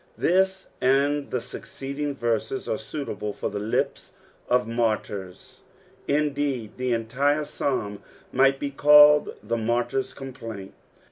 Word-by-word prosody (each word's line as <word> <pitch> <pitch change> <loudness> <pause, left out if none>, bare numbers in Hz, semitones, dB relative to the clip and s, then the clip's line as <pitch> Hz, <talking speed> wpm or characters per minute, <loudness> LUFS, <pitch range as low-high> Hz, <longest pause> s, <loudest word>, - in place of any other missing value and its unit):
This 190 +1 +1
and 140 +2 +2
the - - -1
suceeedine 140 +4 -5
verses 120 +1 -2
are 110 - -1
suitable 110 -5 -5
for - - -4
the 105 - -3
lips 105 +2 -2 0.4
of 125 -1 +2
martyrs, 105 -5 -3 0.5
indeed 140 -6 -1
the 130 0 -1
entire 135 +6 +1
psalm 105 -9 -2 0.3
might 135 +1 +3
be 140 - -3
called 150 +1 +6
the 115 +2 -1
martyr's 120 +3 -1
complaint. 115 -7 -8
130 Hz, 120 wpm, -25 LUFS, 115-145 Hz, 0.5 s, called